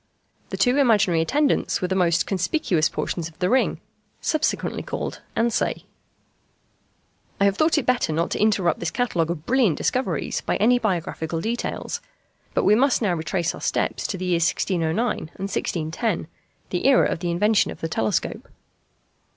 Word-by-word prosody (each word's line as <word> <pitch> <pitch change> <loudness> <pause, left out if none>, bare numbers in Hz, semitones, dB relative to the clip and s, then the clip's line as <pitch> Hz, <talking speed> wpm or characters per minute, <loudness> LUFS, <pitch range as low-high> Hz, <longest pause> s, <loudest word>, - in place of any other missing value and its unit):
The - - -4
two 250 +2 +3
imaginary 205 - +4
attendants 285 - +1
were 180 - -1
the 190 - -1
most 175 -2 +2
conspicuous 185 - +1
portions 170 -2 -3
of 160 - -22
the 180 +1 0
ring, 260 - +2 0.4
subsequently 310 -1 -1
called - - -5 0.2
ansæ. 230 0 0 1.6
I 200 - +4
have 200 -1 +3
thought 310 +7 +2
it 300 - 0
better 250 -9 +1
not 165 +2 -1
to - - -2
interrupt 200 -6 +2
this 170 - -1
catalogue 175 -6 0
of 165 -2 -4
brilliant 245 - +2
discoveries 255 +1 -1
by - - 0
any 245 +3 +3
biographical 170 -5 -2
details; 230 +7 -3 0.5
but - - +2
we 205 - +5
must 245 +2 +3
now 195 -4 +2
retrace 170 +1 -1
our - - -10
steps - - -1
to 195 - -3
the 185 - -4
years 170 -2 +2
1609 180 +5 0
and - - -5
1610, 185 -1 -2 0.4
the 180 +7 0
era 270 -2 +5
of - - -2
the 175 0 -2
invention 205 +5 +2
of - - -8
the 165 - -2
telescope. 110 -9 -2
190 Hz, 165 wpm, -23 LUFS, 170-235 Hz, 1.6 s, we